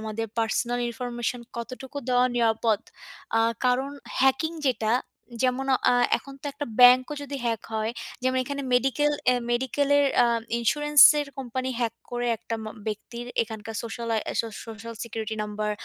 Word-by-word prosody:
আমাদের 220 +1 -3
personal 235 +2 0
information 240 0 -3 0.2
কতটুকু 255 +4 -6
দেওয়া 250 0 +4
নিরাপদ। 225 -2 +2 0.6
আ - - +4 0.2
কারণ 255 +2 +2 0.3
hacking 300 +5 +2
যেটা 225 -3 0 0.5
যেমন 255 +1 +1 0.3
আ - - +4 0.2
এখন 275 - -12
তো - - -5
একটা 290 +1 -5
bank-ও 250 +3 +7
যদি 285 0 -5
hack 225 -2 -1
হয়, 220 0 0 0.3
যেমন 255 0 +1
এখানে 280 +1 -4
medical, 270 +4 +2 0.2
এহ 250 - +1
medical-এর 285 +3 +2 0.2
আ - - +4 0.3
insurance-এর 295 +4 +6
company 260 0 -3
hack 230 -1 0 0.2
করে 245 0 -2
একটা 230 - -5
মা 215 - -5 0.2
ব্যক্তির 235 +3 -5 0.2
এখানকার 220 -1 -7
social 230 0 -5
I 220 - +1 0.2
so 230 - -5 0.2
social 225 +1 -8
security 220 -1 -5
number, 210 0 -3
245 Hz, 150 wpm, -26 LUFS, 225-265 Hz, 0.6 s, bank-ও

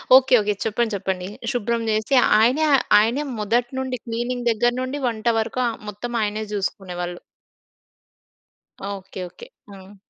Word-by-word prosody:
Okay. 260 -1 +5
Okay. 210 0 0
చెప్పండి. 225 +1 0
చెప్పండి. 185 -1 -3 0.2
శుభ్రం 235 -1 -1
జేసి 215 +5 +1 0.2
ఆయనే 255 +8 +3 0.4
ఆయనే 235 +7 +1 0.2
మొదటి 235 +4 +1
నుండి 260 -1 -2
క్లీనింగ్ 240 +1 -3
దగ్గర 240 +2 +2
నుండి 260 +3 -3
వంట 225 -1 -3
వరుకు 230 +3 -1 0.2
మొత్తం 210 +4 -6
ఆయనే 215 +1 -1
చూసుకునేవాళ్ళు. 180 -3 -3 1.7
ఓకే. 190 -1 -9
ఓకే. 475 - -13 0.2
హ్మ్. 195 0 -13
225 Hz, 125 wpm, -22 LUFS, 205-245 Hz, 1.7 s, ఓకే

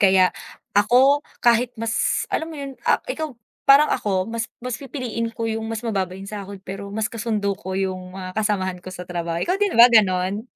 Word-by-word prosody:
Kaya 190 -2 +5 0.4
ako 250 +8 +5 0.2
kahit 240 +1 +4
mas, 225 0 0
alam 320 - -1
mo 315 - -8
yun, 275 -1 -6 0.2
ah, - - +4
ikaw 315 - -4 0.4
parang 285 +2 +8
ako 195 -6 0
mas 230 0 -4
mas 250 0 -4
pipiliin 245 -4 -4
ko 230 0 -4
yung 225 0 -2
mas 225 - -2
mababa 195 -5 -1
yung 195 - -9
sahod 200 -1 -7
pero 195 +1 -6
mas 215 +1 -1
kasundo 215 -3 -2
ko 190 -1 -5
yung 185 -1 -3
mga 185 -1 -6
kasamahan 190 -4 0
ko - - -9
sa 180 -1 -7
trabaho. 170 -1 -2
Ikaw 365 - +1
din 405 - +1
ba 235 - +11
gano'n? 195 -1 +3
215 Hz, 195 wpm, -22 LUFS, 190-235 Hz, 0.4 s, ba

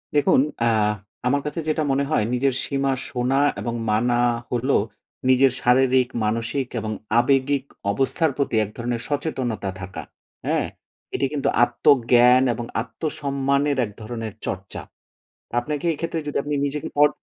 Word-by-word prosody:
দেখুন 145 -2 +4 0.2
আ - - +3 0.6
আমার 140 +3 +2
কাছে 150 +2 -3
যেটা 155 0 +1
মনে 140 +1 +2
হয়, 110 - +3
নিজের 130 +1 +2
সীমা 135 -1 0 0.2
শোনা 125 +1 0 0.2
এবং 120 - -3 0.2
মানা 120 +3 +2 0.3
হলো 125 +3 +1 0.5
নিজের 130 +1 +5
শারীরিক, 130 +1 +4 0.2
মানসিক 115 +4 -1
এবং 110 0 -4 0.3
আবেগিক 135 +2 +2 0.3
অবস্থার 135 - +1
প্রতি 140 -5 0
এক 105 - -5
ধরনের 120 0 -2
সচেতনতা 130 -9 -2
থাকা। 95 +1 -6 0.4
হ্যাঁ? - - +1 0.5
এটি - - +1
কিন্তু 140 - 0
আত্মজ্ঞান 125 0 +5
এবং 120 +1 -5 0.2
আত্মসম্মানের 140 0 -1
এক 105 - -9
ধরনের 110 -1 -5
চর্চা। 95 +1 -5 0.8
আপনাকে 145 +4 -3
এক্ষেত্রে 165 +1 -3
যদি 145 - -4
আপনি 145 +1 -3
নিজেকে 145 +1 -3
পর 150 0 +7
130 Hz, 135 wpm, -23 LUFS, 120-140 Hz, 0.8 s, পর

